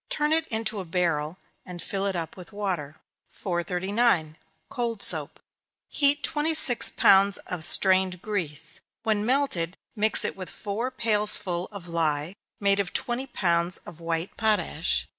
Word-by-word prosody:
Turn 300 +1 0
it 320 0 +1
into 220 -2 -3
a - - -5
barrel, 165 -2 -2 0.3
and 180 -2 -10
fill 195 +3 -3
it 195 - -3
up 165 -2 -5
with 180 +2 -12
water. 180 -8 -4 0.3
439. 180 -1 -1 0.3
Cold 235 -4 -4
Soap. - - +2 0.5
Heat 285 0 +3
twenty 315 +1 0
six 245 -6 +4
pounds 195 +1 +4
of 180 -3 -2
strained 185 +1 +5
grease. 175 -8 -1 0.2
When 215 -2 -1
melted, 240 -11 0 0.2
mix 215 0 +2
it - - -3
with 185 -2 -8
four 220 +5 -4
pailsful 210 -7 +2
of 200 -4 -10
lye, 160 -1 -2 0.3
made 200 0 +3
of 195 -4 -3
twenty 245 +3 -3
pounds 170 -6 0
of 170 - -12
white 165 +1 -4
potash. 175 - -1
195 Hz, 145 wpm, -25 LUFS, 170-220 Hz, 0.5 s, strained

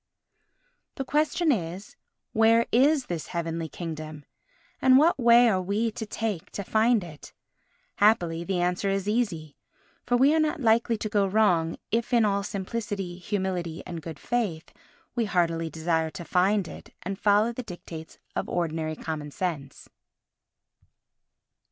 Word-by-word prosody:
The 270 - -4
question 310 +3 +1
is, 185 -3 -3 0.4
where 225 +1 +4
is 275 +3 +4
this 170 -3 -4
Heavenly 165 -2 -3
Kingdom, 155 -3 -7 0.6
and 260 0 +6
what 310 +1 +4
way 240 0 +6
are 190 -5 +2
we 205 +5 0
to 220 0 -6
take 210 -6 -3
to 200 - -4
find 220 +1 +2
it? 155 -4 -11 0.6
Happily 175 -6 +3
the 180 +1 -1
answer 180 +3 0
is 195 0 -1
easy, 195 -10 -1 0.5
for 245 - +1
we 275 +4 +5
are 320 - +3
not 310 0 0
likely 230 -1 +3
to 215 - -3
go 205 -2 +2
wrong 180 -6 +2
if 235 +2 -1
in 235 -2 +5
all 200 -1 +1
simplicity, 200 -2 -4
humility 180 -4 -3
and 170 -2 -6
good 160 -1 -7
faith 200 -6 -2 0.4
we 235 -2 0
heartily 165 -4 0
desire 160 +1 0
to 170 +1 -8
find 190 +2 +2
it - - -11
and 195 +2 -4
follow 210 +3 +3
the 255 - -5
dictates 170 -6 -9 0.2
of - - -2
ordinary 160 -2 -2
common 155 -2 -5
sense. 145 -4 -5
195 Hz, 145 wpm, -26 LUFS, 165-230 Hz, 0.6 s, and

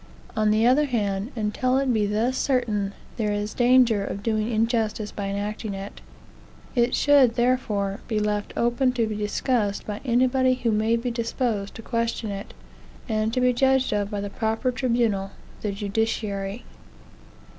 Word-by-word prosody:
On 215 -1 +2
the 215 +2 +3
other 265 +5 +4
hand, 210 -3 -1
until 235 +4 0
it 270 -2 +1
be 210 -2 +1
thus 225 +5 0
certain, 220 -8 0 0.2
there 215 -3 0
is 205 +1 -2
danger 245 -4 +4
of 200 0 -5
doing 215 -1 0
injustice 220 -2 0
by 200 -1 -4
enacting 205 +1 -3
it; 195 +1 -8 0.7
it 240 -1 +2
should, 275 -5 +5
therefore, 220 -5 0
be 220 - -1
left 210 -1 -1
open 240 +2 +2
to 235 -3 +1
be 215 -1 -3
discussed 210 0 -1
by 210 0 -5
anybody 255 +1 +3
who 240 -2 0
may 220 +2 +2
be 235 +1 -2
disposed 230 -3 -2
to 225 - -9
question 230 -2 -2
it, 200 +1 -7 0.5
and 220 -1 0
to 255 - 0
be 250 0 +4
judged 265 0 +2
of 205 -1 0
by 205 -1 -3
the 200 0 -5
proper 225 +3 -1
tribunal, 235 -6 0 0.3
the 210 - -1
judiciary. 200 0 -2
225 Hz, 160 wpm, -25 LUFS, 205-245 Hz, 0.7 s, should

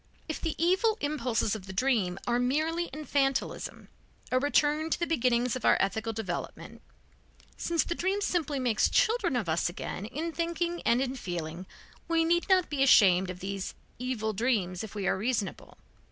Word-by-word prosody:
If 315 - -4
the 325 - -2
evil 380 +6 +2
impulses 250 -8 0
of 200 -3 -8
the 190 - -7
dream 200 -5 +1
are 240 0 +1
merely 315 +7 0
infantilism, 275 -1 -2 0.4
a 255 - +3
return 295 +3 +2
to - - 0
the 340 - +1
beginnings 250 -6 +1
of 255 - -5
our - - +5
ethical 220 +3 0
development, 205 -6 -6 0.7
since 335 -2 0
the - - -2
dream 380 +4 0
simply 335 -7 -1
makes 245 -5 +2
children 450 - +2
of 230 -7 -1
us 165 +2 +1
again 190 +3 -5
in 310 +8 -4
thinking 340 +1 -2
and 240 +3 +4
in 265 0 -3
feeling, 175 -4 -5 0.4
we 330 -1 +2
need 345 +3 +1
not 370 -2 +4
be 285 -2 -2
ashamed 190 -8 +6
of 180 0 -7
these 195 0 -4 0.2
evil 235 -4 -2
dreams 200 -5 0
if 220 -1 -8
we 200 -2 -3
are - - +2
reasonable. 215 0 -3
255 Hz, 170 wpm, -29 LUFS, 210-325 Hz, 0.7 s, ashamed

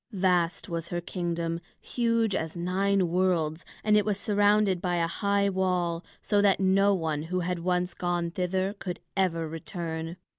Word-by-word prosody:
Vast 180 -4 +1
was 170 -1 -3
her 175 - -2
kingdom, 170 -1 -3 0.2
huge 230 -3 0
as 160 -1 -3
nine 190 +2 +1
worlds, 170 -3 +1 0.2
and 215 -1 +4
it 210 - +5
was 205 -1 -1
surrounded 205 -3 +3
by 180 -1 0
a 170 -1 +2
high 200 +3 +1
wall, 180 -3 0 0.2
so 205 -1 +2
that 200 -1 +4
no 195 +1 +4
one 160 -4 -1
who 180 +3 -2
had 180 0 -2
once 180 +1 0
gone 175 -1 -1
thither 185 +2 -1
could 180 -2 -5 0.2
ever 170 -4 +1
return. 165 +1 -5
180 Hz, 160 wpm, -28 LUFS, 170-195 Hz, 0.2 s, it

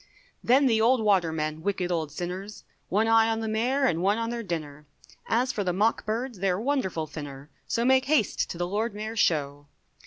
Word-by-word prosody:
Then 265 +4 +4
the 225 -4 +3
old 245 +3 +4
watermen, 160 -6 +1
wicked 185 -1 -1
old 160 -4 -1
sinners, 180 +6 -6 0.3
One 215 +4 +2
eye 225 0 +5
on 225 0 0
the 225 - -3
Mayor 245 +6 0
and 170 -9 +1
one 200 +3 +2
on 230 0 -2
their 240 -1 -3
dinner, 150 -7 -6 0.4
As 245 +3 +2
for 205 - -2
the 180 -2 -1
mock 215 +4 +1
birds, 230 0 -3
they're 185 -1 0
wonderful 220 - -1
thinner, 145 -2 -9 0.2
So 235 - 0
make 260 +1 +4
haste 275 -7 +1
to - - -6
the 175 0 -1
Lord 210 +3 -2
Mayor's 215 +1 -4
Show. 145 -4 0
205 Hz, 195 wpm, -27 LUFS, 170-230 Hz, 0.4 s, eye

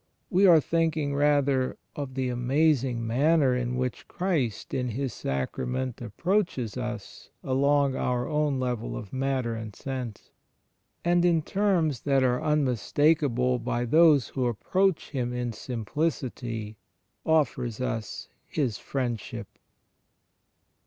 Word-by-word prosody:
We 195 +2 +5
are 170 -3 +8
thinking 155 -2 0
rather 140 -2 +2 0.2
of 140 -3 -5
the 130 -1 -1
amazing 125 -1 +1
manner 135 +3 +3
in 125 0 -1
which 125 -1 -3
Christ 160 - -2
in 125 -1 0
His 130 +2 -3
Sacrament 125 - -3
approaches 130 - -1
us 120 -4 -6
along 140 +1 +2
our 125 -1 -1
own 150 -3 0
level 125 -3 -2
of 105 -5 -9
matter 130 -3 -1
and 110 -3 -6
sense; 125 -5 -6 0.7
and, 175 0 +3
in 170 -3 +3
terms 175 - +1
that 135 -2 +2
are 125 -1 +2
unmistakable 135 -2 +2
by 120 +1 -1
those 150 -1 +5
who 130 -2 -1
approach 185 - 0
Him 125 -3 -2
in 125 -1 -2
simplicity, 115 -3 -3 0.5
offers 130 -7 +1
us 115 -4 -3 0.2
His 130 -9 -1
Friendship. 120 -5 -3
130 Hz, 120 wpm, -27 LUFS, 120-150 Hz, 0.7 s, are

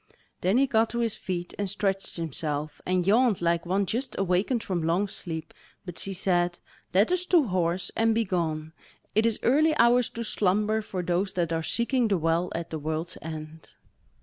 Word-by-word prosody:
Then 190 +6 +2
he 275 - +5
got 225 -4 +2
to 235 - -4
his 230 -3 0
feet, 175 -2 -4
and 200 -1 -1
stretched 195 -1 -2
himself, 150 -2 -2
and 180 -1 +1
yawned 225 +1 +4
like 170 0 0
one 195 +3 +1
just 245 +8 -3
awakened 195 +5 +1
from 180 -3 -2
long 170 +5 +1
sleep. 165 -5 -6 0.3
But 180 -3 -6
she 195 - -1
said: 175 -2 +1 0.3
"Let 200 - +3
us 365 0 +2
to 345 -4 +5
horse 175 0 0
and 225 0 +2
begone; 165 -7 -1 0.4
it 220 +2 +3
is 225 - +1
early 305 +5 +3
hours 240 0 +4
to 235 - -2
slumber, 210 +1 +1
for 190 -4 -4
those 180 +3 0
that 170 -2 -1
are 165 - 0
seeking 235 +7 +1
the 200 -3 +2
Well 165 +2 0
at 165 0 -5
the 160 - -3
World's 160 +3 -3
End." 155 0 -8
185 Hz, 185 wpm, -27 LUFS, 170-220 Hz, 0.4 s, he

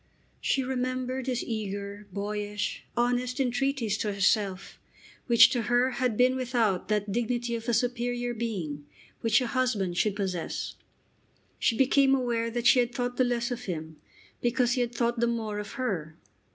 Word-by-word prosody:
She 270 - +1
remembered 255 0 -2
his 250 -2 -1
eager, 205 -2 -5
boyish, 205 +1 -3
honest 245 +2 +1
entreaties 250 -4 0
to 210 - -1
herself, 195 -1 0 0.5
which 235 -2 +7
to 245 - +1
her 245 +2 +3
had 250 -4 -1
been 255 +1 +4
without 240 -7 0
that 210 -1 0
dignity 240 +2 -1
of 230 +1 -3
a - - +2
superior 245 0 -1
being 175 -11 -4 0.3
which 225 -1 +3
a - - 0
husband 225 -8 0
should 210 -2 +1
possess. 190 -4 -3 0.9
She 230 - +2
became 270 0 +4
aware 235 -3 0
that 240 +1 -3
she 255 - +7
had 240 0 0
thought 245 0 -2
the 255 - +4
less 245 0 0
of 245 0 -4
him 160 -4 -5 0.4
because 245 0 +2
he 250 - +1
had 240 0 -2
thought 235 0 0
the 235 - +3
more 220 -3 -2
of 210 - -6
her. 180 - -3
235 Hz, 165 wpm, -28 LUFS, 210-250 Hz, 0.9 s, which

